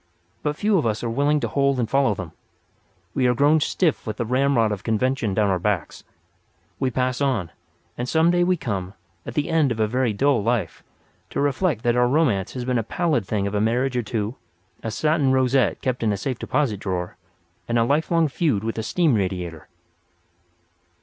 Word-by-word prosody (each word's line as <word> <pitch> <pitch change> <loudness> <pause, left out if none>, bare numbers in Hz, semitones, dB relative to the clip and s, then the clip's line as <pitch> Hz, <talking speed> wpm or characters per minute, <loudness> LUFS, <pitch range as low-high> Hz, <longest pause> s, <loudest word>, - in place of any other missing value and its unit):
But 150 0 -1
few 205 +2 +2
of 140 - 0
us 110 +1 -2
are 120 - -1
willing 145 +5 +2
to - - 0
hold 140 -1 +1
and 120 - 0
follow 135 -3 +2
them. 90 -4 -7 0.8
We 130 - +2
are 125 - +2
grown 145 +5 +4
stiff 160 -1 0
with 110 0 -3
the 120 - -1
ramrod 125 -2 +2
of 105 0 -4
convention 115 -2 0
down 105 -1 +2
our 95 - 0
backs. 95 -2 -2 0.8
We 130 - +1
pass 125 +1 -1
on; 120 -12 0 0.5
and 125 +1 -2
some 160 +1 +3
day 175 0 +3
we 180 0 +2
come, 95 - -4 0.3
at 120 - -6
the 150 - 0
end 155 -5 +3
of 115 - -3
a 110 - +3
very 125 +2 0
dull 135 +3 +2
life, 110 -6 -1 0.5
to - - -4
reflect 145 - 0
that 120 0 +2
our 125 0 +3
romance 125 - +1
has 125 -2 -4
been 125 -1 +1
a - - -1
pallid 150 - -1
thing 100 -2 -1
of 100 - -3
a 105 - +1
marriage 125 +4 +1
or 125 - +1
two, 110 0 -3 0.4
a 115 - -4
satin 150 +3 +1
rosette 130 0 +2
kept 130 -1 -1
in 110 -2 +1
a 100 - -1
safe 125 +4 -3
deposit 125 -10 -1
drawer, 90 -3 -3 0.5
and 120 - 0
a 115 - +4
lifelong 160 +5 +2
feud 135 - 0
with 115 0 -3
a - - -2
steam 160 +5 +2
radiator. 90 -6 -2
125 Hz, 205 wpm, -23 LUFS, 105-140 Hz, 0.8 s, grown